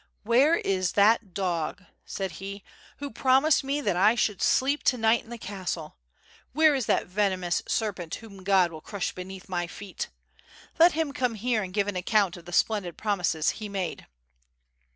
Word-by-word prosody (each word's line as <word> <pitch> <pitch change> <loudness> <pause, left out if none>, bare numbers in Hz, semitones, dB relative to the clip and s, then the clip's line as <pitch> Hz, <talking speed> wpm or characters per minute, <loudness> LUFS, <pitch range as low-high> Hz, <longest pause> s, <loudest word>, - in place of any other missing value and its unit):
"Where 255 +9 +4
is 185 - 0
that 210 0 +4
dog," 180 -1 -2 0.2
said 195 -2 -4
he, 200 0 -7 0.3
"who 285 0 -6
promised 265 +6 +3
me 280 +2 -1
that 205 -9 0
1 210 +6 +4
sheuld 210 -4 0
sleep 280 +3 +2
to 250 - +3
night 225 0 +3
in - - -18
the 235 - -6
castle? 185 -6 -5 0.6
Wl;iere 310 0 +5
is 260 -5 -2
that - - +2
venomous 185 -2 0
serpent 190 -7 -2
whom 200 -4 -12
God 190 -3 +3
will 160 -1 -9
crush 200 +1 -4
beneath 185 +1 -9
my 175 -2 -2
feet? 190 +1 -7 0.7
Let 340 +2 +7
him 310 -2 -1
come 250 -5 -1
here 230 +1 0
and 185 -2 -5
give 200 +1 0
an 205 - -3
account 195 0 +1
of 175 -1 -12
the 175 - -9
splendid 185 -2 0
promises 180 -7 0
he 210 - -5
made." 190 -4 -4
200 Hz, 175 wpm, -27 LUFS, 185-235 Hz, 0.7 s, Let